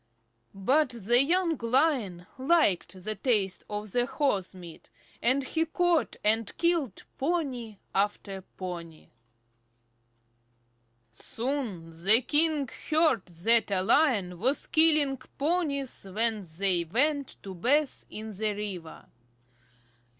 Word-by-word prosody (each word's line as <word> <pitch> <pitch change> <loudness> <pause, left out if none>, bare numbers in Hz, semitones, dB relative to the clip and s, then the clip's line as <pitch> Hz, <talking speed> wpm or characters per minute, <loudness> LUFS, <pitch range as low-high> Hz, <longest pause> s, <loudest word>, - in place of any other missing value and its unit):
But 265 +9 +2
the 240 +1 +3
young 335 +2 +1
Lion 230 - 0
liked 260 - +1
the 215 - -2
taste 205 -4 0
of 210 -1 -6
horse 245 -6 0
meat, 175 -3 -12 0.3
and 260 +3 +2
he 320 +5 -1
caught 350 0 +1
and 220 0 0
killed 335 - 0 0.2
pony 265 - -2 0.2
after 195 -1 -2
pony. 175 -4 -9 2.0
Soon 225 - -4
the 220 +6 +7
king 300 0 +3 0.2
heard 310 - +2
that 200 +7 +2
a 190 -2 0
Lion 200 - +2
was 260 +8 +1
killing 305 -4 +3
the 260 - -19
ponies 280 - -1
when 215 -1 0
they 185 -3 +2
went 280 - 0
to 195 - -7
bathe 275 - 0
in 220 +1 -7
the 215 +1 -1
river. 190 -6 -7
230 Hz, 110 wpm, -28 LUFS, 195-290 Hz, 2.0 s, the